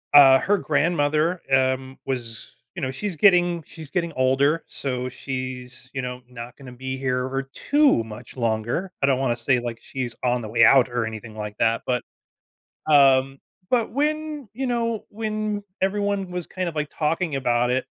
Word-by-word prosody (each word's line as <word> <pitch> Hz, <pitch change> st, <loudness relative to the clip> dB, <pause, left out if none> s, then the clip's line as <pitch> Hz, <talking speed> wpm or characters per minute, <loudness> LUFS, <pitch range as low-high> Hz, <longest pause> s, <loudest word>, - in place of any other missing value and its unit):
uh, 135 Hz, -2 st, +9 dB
her 205 Hz, +2 st, +2 dB
grandmother, 155 Hz, +1 st, +1 dB
um, 130 Hz, 0 st, +1 dB
was, 120 Hz, -4 st, -5 dB, 0.2 s
you -, -, -5 dB
know 130 Hz, -, -1 dB
she's 180 Hz, +7 st, -4 dB
getting 175 Hz, -1 st, +4 dB
she's 160 Hz, -3 st, -11 dB
getting 170 Hz, +1 st, -2 dB
older, 135 Hz, +5 st, +2 dB
so 125 Hz, -2 st, -3 dB
she's, 130 Hz, -1 st, -6 dB
you 130 Hz, -, -1 dB
know, 125 Hz, 0 st, -5 dB
not 120 Hz, 0 st, -9 dB
gonna 130 Hz, -3 st, -11 dB
be 130 Hz, +1 st, -5 dB
here 130 Hz, -1 st, -1 dB
for 135 Hz, +1 st, -2 dB
too 290 Hz, -, +3 dB
much 110 Hz, +4 st, -11 dB
longer- 115 Hz, -, -1 dB
I 140 Hz, -, +3 dB
don't 130 Hz, -2 st, +2 dB
wanna 130 Hz, -3 st, +1 dB
say, 120 Hz, +2 st, +2 dB
like, 120 Hz, -1 st, -5 dB
she's 125 Hz, -4 st, -4 dB
on 125 Hz, -1 st, +1 dB
the 110 Hz, -, -6 dB
way 115 Hz, +1 st, +4 dB
out 130 Hz, -2 st, +6 dB
or 120 Hz, -2 st, -1 dB
anything 110 Hz, 0 st, -7 dB
like 105 Hz, -1 st, -6 dB
that- 115 Hz, 0 st, +2 dB
but, 125 Hz, -1 st, 0 dB, 0.8 s
um, 135 Hz, -2 st, +5 dB, 0.3 s
but 240 Hz, -3 st, +2 dB
when, 300 Hz, -1 st, -1 dB
you 265 Hz, +4 st, -3 dB
know, 230 Hz, -3 st, -1 dB
when 215 Hz, -1 st, -3 dB, 0.2 s
everyone 200 Hz, -1 st, 0 dB
was 180 Hz, -2 st, -4 dB
kind 185 Hz, -2 st, -3 dB
of, 165 Hz, -, -6 dB
like, 150 Hz, -1 st, -2 dB
talking 160 Hz, -1 st, -1 dB
about 125 Hz, -2 st, +1 dB
it, 130 Hz, +1 st, 0 dB
135 Hz, 175 wpm, -24 LUFS, 125-180 Hz, 0.8 s, uh